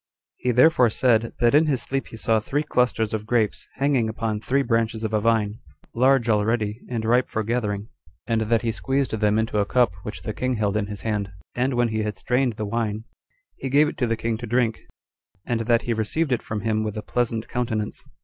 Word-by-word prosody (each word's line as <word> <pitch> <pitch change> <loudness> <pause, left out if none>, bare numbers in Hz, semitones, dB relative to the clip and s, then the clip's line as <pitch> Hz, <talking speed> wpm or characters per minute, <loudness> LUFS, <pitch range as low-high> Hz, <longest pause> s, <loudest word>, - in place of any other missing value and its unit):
2. 125 - 0
He - - +5
therefore 125 0 +5
said, 115 0 +2
that 120 +1 +3
in 155 +2 +5
his 135 -5 +1
sleep 135 0 -2
he 115 - -10
saw 110 0 +2
three 145 +7 -1
clusters 120 -6 +1
of 110 0 -3
grapes 115 -3 0
hanging 135 -4 +1
upon 110 -1 -2
three 135 +5 +1
branches 115 -2 0
of 110 0 -2
a 105 - +2
vine, 110 -1 +1 0.3
large 130 0 +3
already, 110 0 +1
and 115 -3 -2
ripe 120 +3 +3
for 110 - -2
gathering; 105 -2 -2 0.4
and 115 -2 0
that 115 +2 +1
he 115 - +1
squeezed 135 +4 -1
them 105 -1 +1
into 110 -1 0
a 100 - +2
cup 125 -7 +3
which 105 - -7
the 110 - -3
king 130 +3 -1
held 105 -2 0
in 105 -2 0
his 105 -1 -6
hand; 105 -3 -2 0.2
and 130 +1 0
when 120 -1 +2
he 110 0 -1
had 105 -2 -3
strained 125 +4 +1
the 110 0 -4
wine, 110 0 -2 0.5
he 135 - -4
gave 145 +3 +5
it - - -5
to 125 - +1
the 115 0 0
king 115 -1 -2
to 120 - -6
drink, 115 -1 +1 0.7
and 120 -2 -1
that 120 -1 +3
he 120 - 0
received 115 +8 -1
it 125 - +1
from 105 -1 -4
him 110 -1 0
with 110 -1 -3
a 105 - -4
pleasant 115 -2 -1
countenance. 115 -3 -2
115 Hz, 225 wpm, -24 LUFS, 110-125 Hz, 0.7 s, He